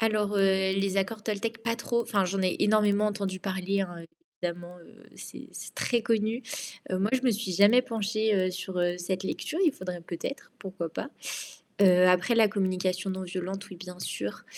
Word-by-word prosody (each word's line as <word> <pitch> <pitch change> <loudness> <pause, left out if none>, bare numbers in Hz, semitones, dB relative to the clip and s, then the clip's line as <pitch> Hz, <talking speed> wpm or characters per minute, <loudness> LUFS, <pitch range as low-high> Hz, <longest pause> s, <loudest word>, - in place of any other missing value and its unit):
Alors, 210 -2 +1
heu, - - +3 0.3
les 195 0 0
accords 210 +3 -1
toltèques, 225 +2 -2
pas 230 0 +1
trop. 235 0 0
Enfin, 200 -4 +1
j'en 190 +2 -1
ai 185 -1 +1
énormément 210 0 +4
entendu 200 -3 -2
parler, 190 0 -1
hein, 175 -3 -3 0.4
évidemment, 175 0 -4
heu, 170 - -17
c'est - - -9
c'est - - -9
très 240 -2 +1
connu. 225 +2 +1 0.5
Heu, 185 - +1
moi, 205 +2 +2
je 260 -1 +2
me 255 - +4
suis 210 -2 -3
jamais 205 +7 +6
penchée, 220 -2 0
heu, 185 -1 +2
sur, 185 0 -5
heu, 175 0 +1
cette 185 +2 -3
lecture. 310 - -3
Il 320 - +4
faudrait 180 -4 -6
peut-être, 170 +11 -6
pourquoi 190 -4 -4
pas. 170 - -5 0.7
Heu, 185 -2 +7
après 180 +6 +4
la 225 -2 +6
communication 185 -1 0
non 190 0 -3
violente, 185 +2 -5
oui, 185 - -8
bien 180 0 -10
sûr. 100 - -4
195 Hz, 190 wpm, -28 LUFS, 185-215 Hz, 0.7 s, Heu